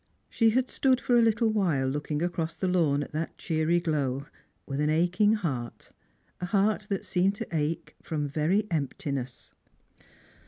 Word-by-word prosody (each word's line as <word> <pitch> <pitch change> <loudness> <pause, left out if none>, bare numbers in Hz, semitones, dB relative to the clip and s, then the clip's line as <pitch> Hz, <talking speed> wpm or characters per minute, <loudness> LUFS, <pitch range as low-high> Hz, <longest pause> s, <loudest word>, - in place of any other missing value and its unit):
She 225 -1 +4
had 255 +3 +1
stood 260 -1 +2
for 245 - +1
a 240 - +6
little 225 0 +3
while 170 -11 +1
looking 150 +3 -2
across 165 -2 -2
the 185 - -2
lawn 155 -6 +2
at - - -10
that 160 +2 -4
cheery 160 +1 +1
glow, 140 -5 -1 0.4
with 140 0 -4
an 150 0 +2
aching 180 +7 +3
heart, 135 - -4 0.5
a 180 - -3
heart 210 +2 +1
that 195 -2 -2
seemed 190 +2 +1
to - - -5
ache 155 +1 -2
from 150 -2 -2
very 160 +9 +1
emptiness. 140 -4 -3
165 Hz, 160 wpm, -28 LUFS, 150-200 Hz, 0.5 s, a